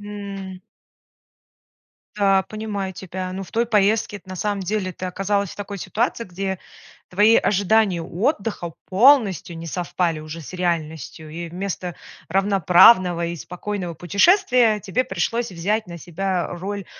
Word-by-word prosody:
М. 200 -2 -7 1.6
Да, 195 -2 +3
понимаю 210 -3 -4
тебя, 185 0 -6
ну 190 +1 -5
в 190 - -11
той 230 +1 +2
поездке- 210 -1 +2
это 190 - -16
на 185 - -6
самом 205 +2 -1
деле 185 -1 -2
ты 185 - -8
оказалась 195 +1 -1
в - - -11
такой 200 0 -6
ситуации, 230 +4 -1
где 190 +1 -4 0.5
твои 210 +4 +5
ожидания 200 -2 +2
отдыха 200 - -2
полностью 200 - +4
не 165 - -7
совпали 170 -1 -1
уже 155 +2 -8
с 150 - -10
реальностью, 160 -3 -3
и 170 +2 -6
вместо 180 0 -4 0.3
равноправного 185 -1 +5
и 170 0 -4
спокойного 180 +1 -5
путешествия, 235 - +3
тебе 215 +6 -1
пришлось 235 -2 -2
взять 200 +5 -1
на 170 -1 -8
себя 180 +2 -2
роль 195 +3 -5
190 Hz, 140 wpm, -22 LUFS, 175-210 Hz, 1.6 s, твои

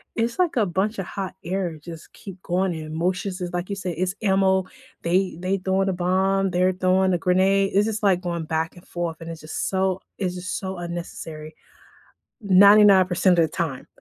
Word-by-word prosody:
it's 230 +6 -1
like 350 -6 +2
a 215 - +3
bunch 195 +5 -1
a - - -1
hot 190 +1 -6
air, 175 -2 -3
just 165 +1 -11
keep 190 -2 -11
going, 185 0 0
and 160 - -6
emotions 180 +4 -2
is 175 0 -4
like 175 +2 -3
you 200 - -2
say, 185 -3 -4
"It's 185 +4 -2
ammo," 190 -1 +2 0.4
they 180 0 +1
they 185 +2 -1
throwing 190 +1 0
a - - 0
bomb, 190 +2 +1
they're 185 +1 +2
throwing 185 0 +2
a 175 - +2
grenade, 195 +2 +2
it's 205 +1 +4
just, 220 0 -3
like, 185 -3 +3
going 170 -3 -3
back 160 +1 -2
and 175 - -16
forth, 170 -2 -4
and 165 - -7
it's 165 -1 -8
just 155 - -4
so 190 -1 0 0.2
it's 185 -3 -2
just 180 0 -4
so 190 -1 -5
unnecessary. 165 -2 -7 0.9
99% 190 -2 +6
of 165 - +5
the - - -7
time. 155 -6 -4
185 Hz, 195 wpm, -23 LUFS, 175-195 Hz, 0.9 s, 99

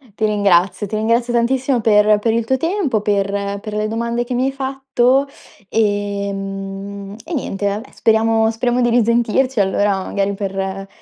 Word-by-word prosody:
Ti 220 - 0
ringrazio, 200 -1 +2
ti 215 - -4
ringrazio 230 +3 +1
tantissimo 250 +1 +1
per 210 -1 +4
per 225 +2 +1
il 230 0 0
tuo 265 +3 +1
tempo, 325 - 0
per 200 0 -1
per 215 0 -7
le 210 0 -1
domande 235 +2 -2
che 240 - -5
mi 255 +2 +1
hai 270 - 0
fatto, 270 0 +1 0.4
ehm, 200 -1 -3
e 345 - -7
niente 205 -8 -2
vabbè 210 +6 -3
speriamo 225 0 +2
speriamo 240 +2 0
di 240 - +3
risentirci 240 +2 +2
allora, 195 0 +1
magari, 200 0 -1
per 195 0 -4
215 Hz, 160 wpm, -18 LUFS, 200-240 Hz, 0.4 s, per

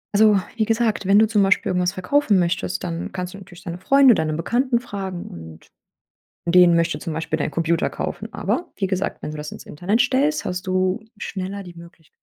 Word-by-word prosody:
Also, 210 -1 +5 0.2
wie 220 - +1
gesagt, 225 -2 0
wenn 200 +2 +5
du 220 - +5
zum 210 -2 +3
Beispiel 195 -1 +2
irgendwas 180 0 +1
verkaufen 205 +2 +2
möchtest, 95 - -1
dann 85 +2 -4
kannst 180 0 -5
du - - -9
natürlich 180 -2 -14
deine 175 +1 -5
Freunde, 270 +3 +6
deine 160 -2 0
Bekannten 240 - 0
fragen 195 -6 -6
und 80 -1 -11 0.8
den 175 0 +6
möchte 170 0 +1
zum 165 - -5
Beispiel 160 0 -2
dein 150 - -2
Computer 165 0 +1
kaufen. - - -5
Aber 350 - -1
wie 195 - -2
gesagt, 190 +1 -2
wenn - - -4
du 155 - -6
das 150 0 -7
ins - - -10
Internet 190 +9 -1
stellst, 270 +5 +1
hast 180 +1 -4
du 185 +3 0
schneller 195 0 -5
die 175 -2 -11
Möglich 170 -1 -15
185 Hz, 200 wpm, -22 LUFS, 170-215 Hz, 0.8 s, Freunde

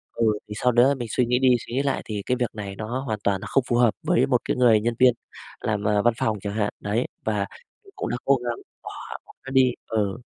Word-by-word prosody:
Ừ, 115 - +1 0.2
thì 105 - -6
sau 125 - +5
đó 125 +4 +5
mình 120 -2 -4
suy 125 - +2
nghĩ 125 +1 +1
đi 130 -1 +4 0.2
suy - - -8
nghĩ 135 +3 +1
lại 140 - 0
thì 105 -2 -4
cái 125 - 0
việc 120 -3 0
này 100 -2 -6
nó 110 +5 -4
hoàn 110 -6 -3
toàn 100 -2 +1
nó - - -6
không 135 - +2
phù 120 - +1
hợp 120 -3 +4
với 125 - +4
một 125 -3 +2
cái - - -1
người 115 -4 +5
nhân 120 +2 0
viên 125 -1 +6 0.5
làm, 105 -2 -1
ờ, 105 -1 +2
văn 120 +2 +3
phòng 110 -1 0
chẳng 100 0 -4
hạn, 105 -1 0
đấy. 105 +4 -1 0.2
Và 105 -2 0 0.4
mình 395 -1 -19
cũng - - -3
đã 120 - -1
cố 140 - +5
gắng 120 -1 -2 0.3
bỏ - - -7 0.4
bỏ - - -17
nó - - -5
đi, 130 -2 +5 0.2
ừ. 105 -2 -1
120 Hz, 270 wpm, -24 LUFS, 105-125 Hz, 0.5 s, viên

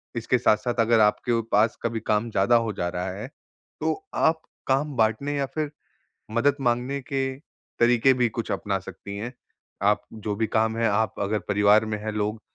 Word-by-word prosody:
इसके 115 +2 +1
साथ-साथ 120 +1 +2
अगर 115 0 +4
आपके 115 +2 +2
पास 110 +3 +3
कभी 115 -1 -1
काम 105 +2 +1
ज़्यादा 100 +5 +3
हो 115 -2 +1
जा 85 -2 -2
रहा 90 +1 -3
है, 105 +6 -6 0.5
तो 400 0 -1
आप 160 0 +2 0.3
काम 140 +2 +1
बाँटने 115 +7 +1
या 140 - +1
फिर 145 +2 -3 0.6
मदद 140 +5 +2
माँगने 125 +2 0
के 135 -1 -1 0.6
तरीके 120 +2 +5
भी 125 -1 +2
कुछ 115 0 -5
अपना 100 -2 -1
सकती 100 +1 -9
हैं। 120 +4 -5 0.5
आप 105 +1 +3
जो 110 -1 -4
भी 110 - 0
काम 110 +1 +1
है, 115 - +2
आप 105 0 +1
अगर 105 +2 0
परिवार 105 +2 +4
में 105 -1 -2
हैं 110 +1 -4
लोग, 105 +1 -2
115 Hz, 180 wpm, -25 LUFS, 105-125 Hz, 0.6 s, तरीके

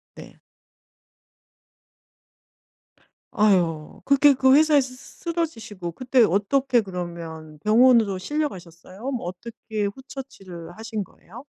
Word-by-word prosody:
네. - - -12 3.0
아유. 180 -8 +1
그렇게 280 0 +5
그 265 +1 +4
회사에서 295 -3 +4
쓰 255 - -12 0.2
쓰 - - -22
쓰러지시고 225 - -4
그때 255 +3 +2
어떻게 240 +6 +2
그러면 170 -4 -7
병원으로 225 -3 +5
실려 295 +10 -1
가셨어요? 185 - -9
뭐 245 -9 -4
어떻게 215 +2 -5
후처치를 200 -8 -9
하신 220 -1 -4
거예요? 235 +10 -14
220 Hz, 255 characters per minute, -24 LUFS, 180-265 Hz, 3.0 s, 그렇게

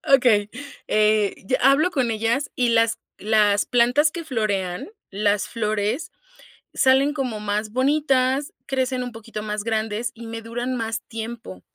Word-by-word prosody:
okey, 215 -5 +3 0.4
eh, 215 -1 +2
ya 255 - +2
hablo 275 +7 +4
con 250 -5 0
ellas 230 +6 -1
y 245 -1 +2
las 230 -1 +2 0.2
las 210 -1 +2
plantas 250 +6 +3
que 340 -1 -6
florean, 200 - -2 0.2
las 205 0 0
flores, 215 +4 -2 0.6
salen 270 +2 +3
como 255 -7 -3
más 210 +1 -2
bonitas, 270 0 +1
crecen 260 -1 -1
un 245 - -6
poquito 225 -1 -8
más 210 -1 -3
grandes 220 +1 -2
y 230 0 -10
me 225 0 -6
duran 240 +3 -3
más 225 0 -3
tiempo. 225 - -7
230 Hz, 145 wpm, -23 LUFS, 215-260 Hz, 0.6 s, hablo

